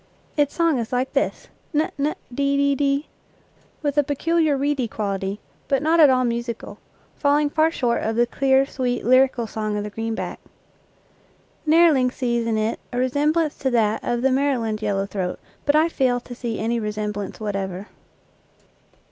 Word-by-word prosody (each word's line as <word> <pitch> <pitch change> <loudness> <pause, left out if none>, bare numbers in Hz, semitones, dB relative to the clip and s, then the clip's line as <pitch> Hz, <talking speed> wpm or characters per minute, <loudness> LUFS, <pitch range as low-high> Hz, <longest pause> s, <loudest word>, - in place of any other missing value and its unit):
Its 290 -2 +1
song 335 -6 +2
is 230 - -4
like 255 +1 -1
this, - - -1 0.3
'n 305 +2 +1
'n 295 +2 0 0.2
de 280 +2 +1
de 280 0 +3
de, 280 +1 0 0.8
with 290 0 +1
a - - +4
peculiar 310 +1 +1
reedy 280 -3 0
quality, 200 -2 -3 0.3
but 275 0 +1
not 325 +2 +3
at 300 -3 +8
all 255 -1 +3
musical, 235 -1 -4 0.4
falling 290 0 +2
far 315 +1 +3
short 245 -7 0
of 220 0 -1
the 240 +1 +4
clear, 265 +2 +2
sweet, 250 -3 -2
lyrical 255 -1 +4
song 215 -1 -3
of 205 - -2
the 210 - -6
green 225 +1 -3
back. - - -5 1.3
Nehrling 305 -6 +5
sees 235 -3 -1
in 225 -1 +1
it 215 +1 -1
a 245 - -4
resem 285 +4 +2
blance 315 -2 -1
to 265 - 0
that 220 -3 +1
of 240 0 -1
the 270 - +3
Maryland 255 -6 0
yellow 200 -2 0
throat, 190 -3 -4 0.3
but 290 - +4
I 310 +2 +5
fail 255 -6 +1
to 245 - -10
see 235 -2 -4
any 230 +2 -1
resemblance 210 -2 -4
whatever. 195 -3 -3
255 Hz, 175 wpm, -23 LUFS, 220-285 Hz, 1.3 s, at